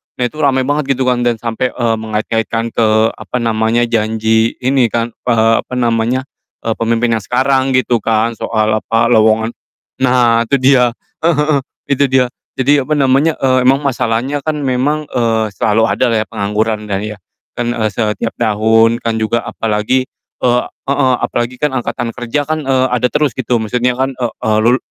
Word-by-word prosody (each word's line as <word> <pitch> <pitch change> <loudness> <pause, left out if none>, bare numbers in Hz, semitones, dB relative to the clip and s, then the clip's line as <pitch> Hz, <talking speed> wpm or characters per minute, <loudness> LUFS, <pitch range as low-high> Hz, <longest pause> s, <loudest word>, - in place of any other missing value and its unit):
nah, 125 - -2
itu 155 - -15
ramai 130 -3 +2
banget 140 -1 0
gitu 130 - -1
kan 125 -1 +1
dan 120 -1 +1
sampai, 115 +2 -2
eee, 115 -2 0
mengait-ngaitkan 110 +1 -2
ke 110 0 +2
apa 125 - -6
namanya, 115 +1 +1
janji 110 0 +1
ini 130 -2 +3
kan, 115 +1 -2 0.2
eee, 115 -1 +3
apa - - -13
namanya, 120 +1 0 0.4
eee, 115 - -1
pemimpin 115 +1 +1
yang - - -13
sekarang 130 +1 +1
gitu 120 -2 +2
kan 115 +2 +1
soal 110 -1 0
apa, 115 +2 +1
lowongan 110 0 +3 0.5
nah, 120 -3 +3
itu 140 - +2
dia, 130 -2 +4 0.3
heeh 170 -2 +3
heeh, 150 -1 +2 0.3
itu 140 +1 +3
dia. 130 -1 +3 0.3
Jadi 140 +2 +3
apa 155 - +1
namanya, 140 +3 +2
eee, 130 -1 +3
emang 135 +2 +3
masalahnya 130 +1 -1
kan 155 -1 0
memang, 140 +4 0
eee, 115 -2 +1
selalu 110 +4 +2
adalah 120 -3 +1
ya - - -21
pengangguran 105 +1 -1
dan 100 0 -2
iya, 105 -1 -6 0.4
dan, 120 0 -1
eee, 110 -1 0
setiap 110 0 -1
tahun 115 +1 +3
kan 115 -1 -1
juga 115 +2 0
apalagi, 115 +4 -1 0.4
eee 125 0 +3 0.3
heeh, 135 -2 +2
apalagi 120 +1 -2
kan 150 -3 0
angkatan 120 -1 -3
kerja 130 +4 -2
kan, 155 -1 -2
eee, 130 -1 +2
ada 125 0 +2
terus 150 -5 +1
gitu 120 - 0
maksudnya 125 +3 0
kan, 135 0 0
eee 120 -3 -2
eee, 110 -1 +2
lul 125 +2 +4
120 Hz, 175 wpm, -15 LUFS, 110-130 Hz, 0.5 s, dia